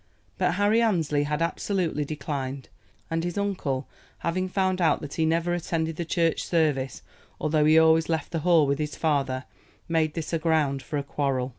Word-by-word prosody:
But - - +2
Harry 205 +4 +3
Annesley 160 -10 +1
had 150 +2 0
absolutely 170 -3 -1
declined; 140 -3 -4 0.4
and 165 0 0
his 175 +1 -3
uncle 170 -10 -2 0.3
having 185 +3 -2
found 185 -1 0
out 165 - +3
that 145 - -7
he 160 -1 +1
never 165 +2 +1
attended 165 -2 -2
the 170 - -3
church 165 0 +1
service, 150 -6 0 0.4
although 155 0 +2
he 155 +1 +6
always 160 0 +5
left 160 -3 -1
the 165 - -1
Hall 165 -1 +4
with 140 +1 0
his 150 -1 -3
father, 140 -4 0 0.4
made 160 -2 +1
this 165 0 -4
a 165 - +1
ground 155 -4 +1
for 150 - -4
a 140 - -2
quarrel. 135 -3 -1
160 Hz, 180 wpm, -26 LUFS, 145-170 Hz, 0.4 s, he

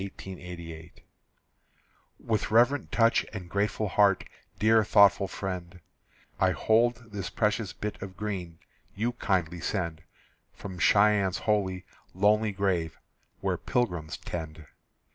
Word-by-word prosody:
_) 85 -3 -9 1.3
With 110 -2 -2
reverent 120 +6 +3
touch 115 0 +3
and 95 -5 -7
grateful 105 +3 -1
heart, 100 0 +3 0.3
Dear 110 +1 +4
thoughtful 100 -2 +5
friend, 90 -3 -6 0.6
I - - +3
hold 115 0 +1
this 100 -3 -4
precious 105 -1 0
bit 105 -1 -6
of 95 -1 -8
green 95 -6 -4 0.4
You 115 +4 0
kindly 90 -7 -1
send 85 -4 -3 0.5
From 95 -3 -8
Cheyenne's 100 -1 +4
holy, 95 -4 -1 0.3
lonely 105 +3 +3
grave, 95 -5 -1 0.4
Where - - 0
pilgrims 90 -11 -2
tend. 80 -2 -7
100 Hz, 110 wpm, -28 LUFS, 90-105 Hz, 1.3 s, thoughtful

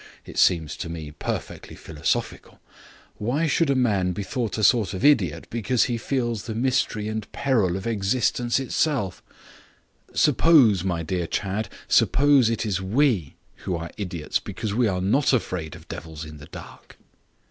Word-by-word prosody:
It - - -5
seems 80 -3 +3
to 85 - -5
me 80 -3 -6
perfectly 75 - -5
philosophical. 75 -2 -3 0.6
Why 130 +10 0
should 160 0 +2
a 140 - +3
man 100 -8 +1
be 100 - -4
thought 115 0 -3
a 110 - -2
sort 105 -5 +3
of 105 - -2
idiot 105 - +3
because 120 +1 +1
he 120 -2 -1
feels 120 -5 -2
the 110 -2 -5
mystery 120 -3 0
and 110 -1 -5
peril 105 -10 +1
of 95 - -7
existence 120 +3 0
itself? 135 - -1 0.9
Suppose, 135 - +4
my 85 -3 -1
dear 85 +1 -2
Chadd, 100 +5 -2 0.2
suppose 140 -4 +4
it 115 -1 -1
is 95 -3 -1
we 105 - +1 0.2
who 90 - -3
are 85 0 -5
the - - -8
idiots 90 -5 -2
because 105 -2 -5
we 120 +1 +2
are 90 -3 -1
not 135 +10 +2
afraid 90 - -2
of - - -14
devils 80 -1 -7
in 75 0 -10
the 75 +1 -12
dark?" - - -12
105 Hz, 165 wpm, -24 LUFS, 90-125 Hz, 0.9 s, Suppose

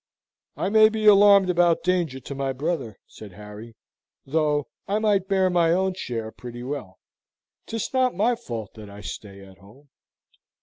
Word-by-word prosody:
"I - - -1
may 215 +1 +6
be 220 -1 -3
alarmed 200 -2 +7
about 175 -1 +2
danger 175 -7 0
to 135 - -8
my 135 -1 -2
brother," 135 - -3
said 105 -4 -13
Harry, 105 +3 -11 0.5
"though 150 -1 0 0.2
I 205 - 0
might 205 -3 +1
bear 190 -1 +2
my 170 -2 +3
own 190 +1 +1
share 115 -10 -5
pretty 120 0 -9
well. 125 -8 -6 0.7
'Tis 225 +2 -4
not 255 -4 +1
my 220 +6 +2
fault 115 - -7
that 105 -2 -11
I 100 +1 -11
stay 100 -1 -9
at 95 -1 -17
home." 120 +10 -19
150 Hz, 165 wpm, -24 LUFS, -, 0.7 s, alarmed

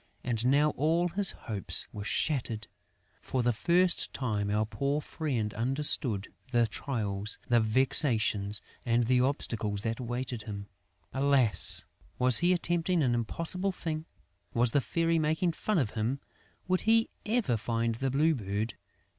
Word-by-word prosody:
And 120 -1 -1
now 145 +3 +3
all 165 +5 +1
his 195 +3 +5
hopes 105 -6 -3
were 105 - -6
shattered! 115 -2 -1 0.6
For 130 -2 -2
the 120 0 +2
first 175 +8 +2
time, 105 -6 -2
our 105 +1 +1
poor 140 +6 -2
friend 130 -9 -3
understood 120 -4 0 0.2
the 120 -2 +3
trials, 105 -4 -4
the 120 -1 +4
vexations 110 -3 +3 0.2
and 120 0 +1
the 125 +2 +2
obstacles 110 -6 -1
that 115 +1 -2
awaited 125 -1 -4
him! 100 -2 -7 0.5
Alas, 135 -5 +2 0.3
was 125 -1 +7
he 175 +1 +3
attempting 175 -1 0
an 125 -3 +1
impossible 165 - -1
thing? 160 -3 -5 0.5
Was 120 0 +3
the 140 - +2
Fairy 165 +4 0
making 160 +3 +1
fun 210 +4 -2
of 130 -10 0
him? 115 +5 -2 0.5
Would 185 0 +1
he 225 0 +4 0.2
ever 215 - +1
find 115 +1 -1
the 135 +4 -2
Blue 150 +5 +2
Bird? 105 -2 -3
125 Hz, 145 wpm, -29 LUFS, 110-155 Hz, 0.6 s, was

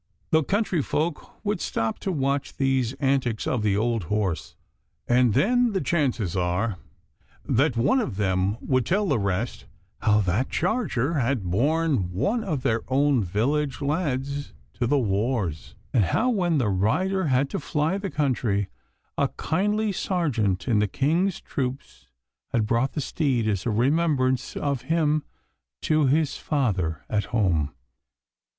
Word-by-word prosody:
The 160 -1 +5
country 195 -1 0
folk 155 +8 -3
would 205 -3 -1
stop 115 -1 -2
to 195 - -2
watch 140 -3 -1
these 135 -3 +1
antics 135 -6 0
of 125 - 0
the 105 -2 +1
old 115 -3 0
horse, 100 -2 -2 0.5
and 120 -3 +3
then 245 +1 +3
the 190 - +1
chances 125 - 0
are 90 +3 0 0.7
that 135 0 +2
one 140 - +3
of 220 - -2
them 95 0 +1
would 130 -2 +1
tell 200 - +1
the 135 -9 +2
rest 100 +4 -2 0.3
how 105 -1 +3
that 100 +7 0
charger 170 - 0
had 125 -3 0
borne 130 - +1
one 210 - 0
of 155 -10 -2
their 115 -4 +1
own 135 -2 +2
village 135 - 0
lads 140 - -2 0.2
to 120 - -1
the 145 +4 +3
wars, 105 - -1 0.2
and 110 -7 +4
how, 230 - +1
when 175 -7 +1
the 120 -6 +1
rider 175 - +1
had 135 0 +2
to - - -2
fly 155 +5 -1
the 200 -1 -3
country, 120 -9 0 0.5
a - - +3
kindly 210 +5 0
sergeant 135 - -1
in 115 -4 +3
the 105 - +2
King's 165 - +1
troops 125 - -5 0.4
had 110 -3 +1
brought 115 +4 +1
the 150 - -2
steed 130 -6 0
as 100 0 -1
a - - +2
remembrance 130 +2 +1
of 140 -3 -1
him 155 -2 +2 0.6
to 155 -2 +3
his 150 +1 +1
father 100 - -1
at 105 -1 0
home. 85 - +1
130 Hz, 150 wpm, -25 LUFS, 105-155 Hz, 0.7 s, The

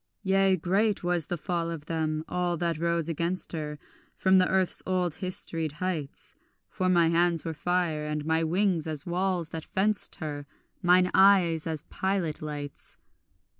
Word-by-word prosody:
Yea, 195 -1 +3
great 195 +5 +1
was 175 -3 0
the 175 - -2
fall 170 0 -2
of 165 -3 -6
them, 155 -1 -2
all 175 -1 -1
that 170 -1 -1
rose 170 -1 0
against 170 +3 -2
her, 150 -2 -4 0.4
From 190 0 +4
the 185 - +3
earth's 190 -1 +2
old 180 -3 0
historied 165 -3 -4
heights; 160 -3 -4 0.4
For 185 0 0
my 170 -2 +4
hands 170 -1 +2
were 165 - -2
fire, 160 -1 -1
and 150 0 -3
my 160 +1 +2
wings 175 -1 +1
as 155 -3 -4
walls 180 -1 -1
that 160 -1 -6
fenced 205 +1 0
her, 145 -2 -6 0.3
Mine 180 +1 +4
eyes 185 -5 +5
as 160 -3 -3
pilot 190 -5 -2
lights. 145 -2 -6
170 Hz, 160 wpm, -28 LUFS, 155-185 Hz, 0.4 s, eyes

